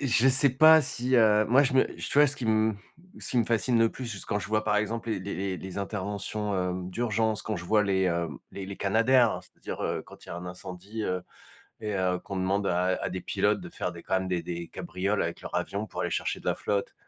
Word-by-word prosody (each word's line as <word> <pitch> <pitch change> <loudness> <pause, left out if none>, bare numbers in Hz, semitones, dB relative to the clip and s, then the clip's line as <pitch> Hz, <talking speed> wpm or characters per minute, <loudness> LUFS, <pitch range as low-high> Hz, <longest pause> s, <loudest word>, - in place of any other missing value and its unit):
je 130 -2 +4
sais 135 +1 +5
pas 155 +5 +7
si, 125 -1 0
heu, 110 -2 +5
moi 130 +5 +6
je 135 - +1
me 130 - +5
tu 145 - -1
vois 150 - +8
ce 140 +1 -2
qui 130 - -5
m 110 -1 +2 0.4
ce - - -4
qui 125 - +2
me 115 - +3
fascine 115 +2 +2
le 115 0 +4
plus, 130 - -7
juste, 110 -5 -6
quand 105 - 0
je 95 - -5
vois 110 0 +1
par 105 -1 +2
exemple 115 +2 -1
les 110 - 0
les 100 +2 -5
les 95 +1 -2
les 95 +2 -7
interventions, 100 +1 -3
hem, 90 0 -2
d'urgence, 110 0 0
quand 110 - -2
je 90 - -7
vois 105 +3 +3
les, 95 -2 +1
heu, 85 -1 0 0.2
les 95 -1 -6
les 100 0 -7
Canadair, 115 +4 +3
c'est-à-dire, - - -8
heu, - - -1
quand - - -15
il - - -17
y - - -7
a - - -5
un 90 +1 -7
incendie, 95 +4 -7
heu 90 -2 -1 0.6
et 105 -2 -3
heu, 90 -1 +1
qu'on 100 +1 -7
demande 95 +2 0
à 90 +1 +1
à - - 0
des 95 0 -4
pilotes 105 +3 +1
de 175 - -8
faire 90 - -3
des 85 -1 -10
quand - - -2
même 95 - -4
des 90 -2 -1
des 85 -1 -5
cabrioles 100 +3 -2
avec 85 - -3
leur - - -8
avion 100 +2 -2
pour - - -6
aller - - -1
chercher - - -2
de - - -19
la - - +2
flotte 100 -1 -2
105 Hz, 260 wpm, -28 LUFS, 95-115 Hz, 0.6 s, vois